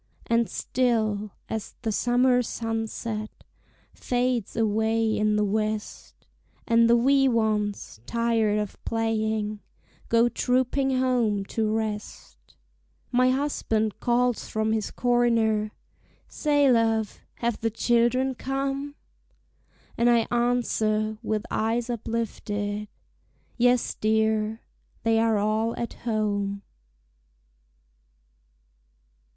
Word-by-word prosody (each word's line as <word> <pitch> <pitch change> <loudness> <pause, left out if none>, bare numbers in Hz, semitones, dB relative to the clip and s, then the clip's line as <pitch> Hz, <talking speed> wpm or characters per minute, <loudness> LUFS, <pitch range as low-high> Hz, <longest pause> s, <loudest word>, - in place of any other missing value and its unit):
And 230 -1 +1
still, 215 -5 0 0.2
as 220 -1 -5
the 225 - 0
summer 245 +3 +3
sunset 225 -1 -3 0.6
Fades 245 -3 -1
away 220 0 +1
in 215 0 +1
the 210 0 +2
west, 215 +1 -3 0.4
And 230 0 +4
the 235 - +6
wee 270 +3 +4
ones, 215 - -1
tired 230 -2 +1
of 210 -2 -4
playing, 220 -2 -1 0.5
Go 230 +1 +4
trooping 260 +2 +1
home 235 -6 +1
to 220 -1 0
rest, 210 - -4 0.7
My 255 +1 +4
husband 240 -6 -1
calls 245 0 +1
from 220 0 0
his 220 -2 -1
corner, 230 -3 +1 0.6
"Say, 290 -3 +2
love, 225 -3 +1 0.2
have 235 -1 -2
the 225 - +1
children 240 +4 +2
come?" 275 +2 -3 1.0
And 235 +1 +4
I 235 -2 +4
answer, 220 -3 0
with 215 -1 -2
eyes 230 +2 0
uplifted, 210 -2 -3 0.7
"Yes, 245 0 +2
dear! 220 0 0 0.4
they 225 0 +3
are 225 -1 +2
all 215 +2 0
at 235 - -4
home." 205 -3 -2
225 Hz, 100 wpm, -26 LUFS, 215-240 Hz, 1.0 s, the